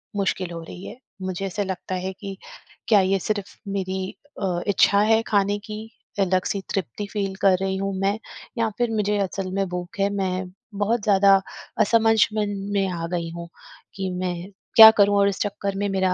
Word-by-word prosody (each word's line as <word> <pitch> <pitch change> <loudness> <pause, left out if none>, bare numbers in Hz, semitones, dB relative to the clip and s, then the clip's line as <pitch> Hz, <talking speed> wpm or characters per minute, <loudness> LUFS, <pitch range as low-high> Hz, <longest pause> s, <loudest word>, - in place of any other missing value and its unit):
मुश्किल 190 -2 -1
हो 165 -1 -6
रही 180 +3 -10
है, - - -9 0.2
मुझे 185 +1 -3
ऐसा 195 +2 -2
लगता 190 -1 -4
है 185 +1 -3
कि 195 -1 -7 0.5
क्या 215 -3 +6
ये 190 +1 +1
सिर्फ 205 +1 -3
मेरी 190 -1 -3 0.3
अ, 180 -2 0
इच्छा 200 0 +4
है 220 +1 +4
खाने 205 0 +2
की, 215 +1 -8 0.3
अलग 185 -1 +2
सी 200 - -2
तृप्ति 195 - -3
फील 195 -2 -2
कर 190 -2 +5
रही 190 0 -1
हूँ 195 0 -2
मैं 195 +2 +1 0.4
या 230 -1 +1
फिर 240 -1 0
मुझे 210 -1 +1
असल 195 -1 -2
में 195 0 0
भूख 180 +4 -6
है? 195 0 +2
मैं 185 -2 -2 0.2
बहुत 210 +3 0
ज़्यादा 195 -1 +5 0.5
असमझमन 220 -1 +3 0.2
में 195 -1 +1
आ 170 -2 -3
गई 170 -1 -3
हूँ 170 0 -7 0.5
कि 190 -1 -3
मैं 180 +1 -4 0.2
क्या 220 -1 +12
करूँ? 205 -2 +3
और 200 0 +4
इस 195 - -5
चक्कर 200 -1 -2
में 205 +1 0
मेरा 190 -1 +1
195 Hz, 185 wpm, -23 LUFS, 185-205 Hz, 0.5 s, क्या